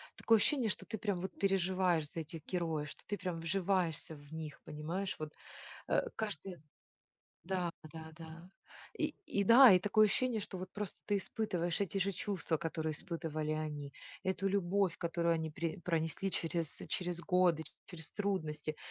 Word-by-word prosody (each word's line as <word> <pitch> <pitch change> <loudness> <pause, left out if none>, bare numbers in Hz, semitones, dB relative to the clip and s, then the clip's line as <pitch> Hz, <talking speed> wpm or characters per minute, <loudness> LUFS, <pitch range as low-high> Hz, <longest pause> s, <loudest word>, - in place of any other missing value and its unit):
такое 225 - +5
ощущение, 240 +1 +3
что - - -3
ты 220 - -3
прям 195 -3 -1
переживаешь 185 -4 +2
за - - -4
этих 160 +1 -7
героев, 165 -5 -1
что - - -10
ты 205 - -1
прям 180 -2 -3
вживаешься 170 -2 0
в 145 +1 -14
них. 155 -2 -6
Понимаешь? 170 +6 -3
Вот, 155 -1 -4 0.6
э, - - +3
каждый 195 -4 -4 0.9
Да, 180 -1 0 0.2
да, 160 -1 -8
да. 165 +2 -10 0.5
И - - 0
и 200 - +1
да, 240 +4 +10
и 185 - +7
такое 215 +3 +5
ощущение, 230 +2 +1
что 195 -2 -6
вот 185 +1 -6
просто 210 -2 -4
ты 205 -1 +2
испытываешь 180 -5 -1
эти 200 0 0
же 195 +1 +2
чувства, 185 -3 -1
которые 160 0 -2
испытывали 155 -1 -2
они, 150 -2 -3 0.3
эту 190 +1 0
любовь, 195 -1 +2
которую 170 0 +1
они 160 -1 -2
при 165 +1 -2
пронесли 165 +2 -1
через 165 -2 -1
через 175 -1 -1
годы, 180 -3 +3 0.2
через 165 -3 -7
трудности, 155 -7 -2
175 Hz, 160 wpm, -35 LUFS, 160-195 Hz, 0.9 s, да